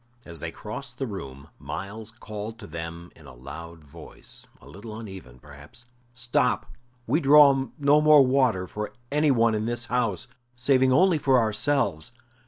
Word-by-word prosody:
As 85 -1 -8
they 85 - -4
crossed 125 +8 -8
the 135 - -2
room 70 - -8
Myles 105 +2 -7
called 110 -1 -8
to 115 - -11
them 85 0 -8
in 75 -3 -16
a 65 - -13
loud 80 +6 -10
voice 70 - -10
a - - -17
little 105 +8 -9
uneven, 95 - -10
perhaps: 75 - -14 0.3
"Stop! 120 -1 0 0.3
We 150 +9 +1
draw 140 -2 +6
no 145 0 +4
more 150 -2 +7
water 125 -8 +2
for 105 +3 -6 0.2
any 150 +1 +2
one 115 -4 +3
in 110 +1 -1
this 120 0 -3
house, 115 -8 0 0.3
saving 130 +1 +3
only 180 +4 +4
for 135 -2 +3
ourselves. 115 - 0
110 Hz, 160 wpm, -25 LUFS, 85-130 Hz, 0.3 s, more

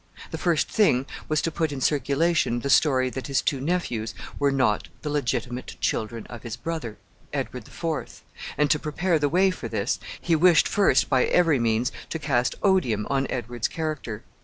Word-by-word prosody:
The - - -3
first 170 -4 +2
thing 135 - +3 0.2
was 155 0 +1
to 165 - 0
put 160 -1 -1
in 140 - -4
circulation 140 -1 +1
the 140 - -1
story 130 -4 +4
that 130 - -5
his 140 -2 +1
two 140 -3 -1
nephews 130 -9 -2 0.2
were 145 - +3
not 130 -6 +1 0.2
the 150 - -2
legitimate 125 -3 -2
children 115 +1 -2
of 120 -2 -9
his 115 -3 -5
brother, 160 -10 -5 0.3
Edward - - -4
the - - -15
Fourth, - - -4 0.3
and 150 0 +3
to 150 - +3
prepare 160 +3 0
the 145 -1 +1
way 185 +4 +4
for 160 -10 -6
this, 110 0 -1 0.2
he 170 - +1
wished 170 0 +5
first, 195 -10 +3
by 130 -2 +3
every 165 -6 +3
means, 115 +1 +1 0.2
to - - -2
cast 130 -5 0
odium 125 - +2
on 135 -1 +1
Edward's 120 -2 -2
character. 155 -10 -4
140 Hz, 185 wpm, -25 LUFS, 120-160 Hz, 0.3 s, wished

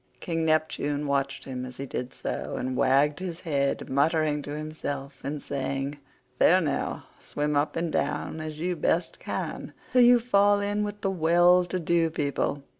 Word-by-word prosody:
King 165 -2 -2
Neptune 155 -2 0
watched 140 -1 -1
him 130 -2 -5
as 125 -1 -8
he 140 - -4
did 125 -1 -4
so, - - -4
and 130 0 -2
wagged 140 +4 +3
his 180 -2 -5
head, 140 -5 -1
muttering 150 +2 +1
to 145 +1 -6
himself 145 -3 -5
and 145 +2 -3
saying, 140 +1 -3 0.4
"There - - +6
now, - - -2 0.2
swim 150 0 -2
up 145 +1 +1
and 165 -1 -1
down 160 - -1
as 155 -1 -6
you 180 +2 -1
best 170 +1 0
can - - -5 0.2
till 250 - +6
you 245 0 +7
fall 205 -3 +3
in 205 +1 -1
with 205 0 -5
well 175 0 +4
to 180 +1 -3
do 170 0 +2
people. 145 -2 -1
155 Hz, 170 wpm, -27 LUFS, 140-175 Hz, 0.4 s, you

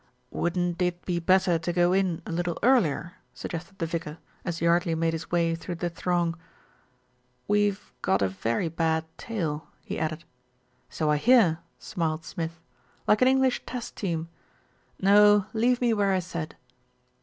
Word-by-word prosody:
"Wouldn't 175 0 -1
it 180 0 -1
be 175 -2 0
better 180 -1 +3
to 165 +2 -2
go 175 +1 +3
in 185 -4 +1
a - - -6
little 175 0 -1
earlier?" 185 - +2 0.2
sug - - -6
gested 175 +3 -7
the 170 - -1
vicar, 160 -2 -4 0.3
as 175 -2 -3
Yardley 170 0 +2
made 165 0 0
his 165 0 -5
way 170 -1 +2
through 170 +2 -5
the 175 +1 -3
throng. 175 0 0 1.1
"We've 205 -1 +1
got 190 - +2
a - - +3
very 115 - -1
bad 160 0 0
tail," 165 -9 -3 0.2
he - - -4
added. 155 +1 -2 0.7
"So 155 -2 0
I 150 - +3
hear," 210 - +5 0.2
smiled 160 -2 -3
Smith. 165 0 -5 0.5
"Like 210 - +3
an 255 - +6
English 265 -1 +3
Test 245 -1 -6
Team. 165 -5 -2 0.7
No, 205 +1 +6
leave 240 +2 +2
me 240 -2 +3
where 200 -2 +2
I - - +3
said." 170 -3 -5
175 Hz, 160 wpm, -27 LUFS, 165-195 Hz, 1.1 s, an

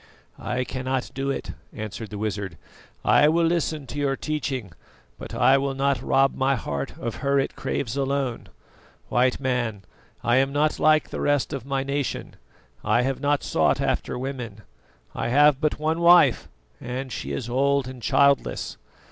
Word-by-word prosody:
"I 125 +1 -2
cannot 130 0 -3
do 135 +1 -2
it," 135 - -3 0.2
answered 110 +1 -6
the 105 - -6
wizard. 100 -4 -3 0.5
"I 150 - +5
will 165 +1 +3
listen 165 -3 0
to 130 +3 -6
your 140 -1 +1
teaching, 135 - -3 0.5
but - - -7
I 135 +1 +5
will 135 0 -2
not 135 -2 +1
rob 135 +1 +3
my 135 +1 +1
heart 70 - -4
of 115 - -4
her 140 -1 +1
it 135 - -2
craves 120 -4 -3
alone. 135 -3 -1 0.6
White 125 +1 +2
Man, 120 -6 -1 0.4
I 120 +2 +3
am 135 +1 +2
not 150 +2 +1
like 155 0 +3
the - - -4
rest 145 0 +1
of 135 -2 -5
my 135 -1 -1
nation. 140 0 -3 0.5
I 115 +3 +2
have 135 +1 -1
not 145 0 +1
sought - - +2
after - - -1
women; 125 -5 -6 0.5
I - - -2
have 145 +3 +4
but 155 -1 +1
one 155 +2 -1
wife, 175 +1 +5 0.3
and 130 +2 -5
she - - -5
is 120 - -3
old 140 +2 +1
and 130 -1 -9
childless. 140 +5 +2
135 Hz, 165 wpm, -24 LUFS, 125-140 Hz, 0.6 s, I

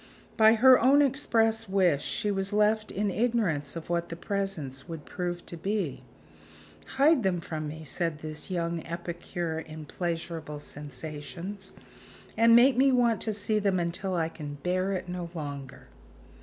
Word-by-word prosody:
By 220 0 +6
her 255 +3 +7
own 275 +4 +5
express 225 -5 +1
wish, 180 -7 +2
she 210 - -1
was 195 0 -1
left 210 +1 +2
in 205 0 -1
ignorance 200 -12 0
of 165 - -6
what 170 0 -1
the 170 - -5
presents 175 -8 -3
would 165 -3 -7
prove 175 -2 -4
to - - -7
be. 170 -7 -2 1.0
"Hide 290 +1 +5
them 190 -4 +1
from 155 -2 -5
me," 160 +2 -7
said 160 +2 -2
this 155 +2 -6
young 170 -2 -2
epicure 170 -1 -4
in 155 -1 -8
pleasurable 165 -2 -4
sensations, 155 +8 -7 0.6
"and 230 +1 +6
make 250 +2 +6
me 270 +1 +5
want 240 -3 +3
to 220 - -1
see 210 +1 0
them 200 -3 +1
until 175 +2 -2
I 165 -2 +1
can 150 -3 -7
bear 185 +2 0
it 185 -2 -3
no 180 -1 -5
longer." 140 -4 -7
180 Hz, 155 wpm, -28 LUFS, 160-215 Hz, 1.0 s, her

